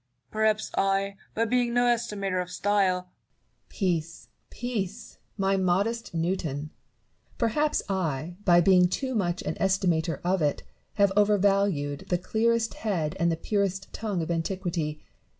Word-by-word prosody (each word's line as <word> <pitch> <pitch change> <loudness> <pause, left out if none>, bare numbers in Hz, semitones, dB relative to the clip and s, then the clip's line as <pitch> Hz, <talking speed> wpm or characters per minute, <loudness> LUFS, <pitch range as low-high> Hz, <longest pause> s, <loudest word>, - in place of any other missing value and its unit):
Perhaps 215 0 +1
I, 195 0 +1 0.2
by 230 - +2
being 240 0 +1
no 245 - +4
estimator 210 -6 0
of 180 - -6
style 195 -3 +1
Barrow. 180 - -25 0.6
Peace, 170 -4 -2 0.2
peace! 225 -3 -5 0.2
my 195 -1 +2
modest 195 +4 0
Newton! 160 -4 -2 0.7
Perhaps 295 +6 +1
I, 175 -4 -2
by 175 -3 +6
being 180 0 +5
too 260 +8 -2
much 180 -6 -1
an - - -2
estimator 175 -5 +1
of 180 0 +1
it, 145 -1 0 0.3
have 200 -2 +4
overvalued 200 -8 +2
the 180 - +2
clearest 225 +4 +1
head 175 -7 -2
and 170 0 +3
the 165 - -1
purest 195 0 -1
tongue 205 -6 -2
of 160 - -3
antiquity. 165 -3 -2
195 Hz, 135 wpm, -27 LUFS, 175-215 Hz, 0.7 s, by